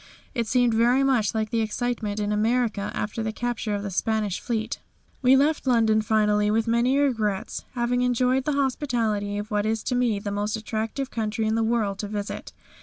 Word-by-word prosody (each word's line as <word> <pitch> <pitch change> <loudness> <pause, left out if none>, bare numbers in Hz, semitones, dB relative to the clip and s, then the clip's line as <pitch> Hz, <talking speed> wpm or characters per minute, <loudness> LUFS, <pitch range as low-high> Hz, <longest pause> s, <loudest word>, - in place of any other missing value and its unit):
It 235 -3 -1
seemed 245 -1 +3
very 240 +4 +3
much 245 -6 +2
like 220 -1 -1
the 230 - +1
excitement 220 -1 -2
in 205 0 -1
America 220 -1 +1
after 215 +2 -3
the 220 0 -2
capture 230 -2 -2
of 200 - -4
the 200 - -4
Spanish 210 0 0
Fleet. 225 -2 -3 0.4
We 260 0 +6
left 290 +1 +2
London 225 -3 +4
finally 210 -1 +2
with 220 +1 +2
many 240 +4 +2
regrets, 220 -9 -1
having 245 0 0
enjoyed 250 +1 +2
the 300 - +1
hospitality 235 -7 0
of 205 +2 -5
what 210 0 +1
is 220 0 -1
to - - -2
me 245 -4 +2
the 200 0 -4
most 205 +1 -1
attractive 220 +4 -3
country 220 0 -2
in 215 - +1
the 225 - +1
world 220 -3 0
to 205 - -3
visit. 205 0 -5
225 Hz, 190 wpm, -25 LUFS, 210-245 Hz, 0.4 s, We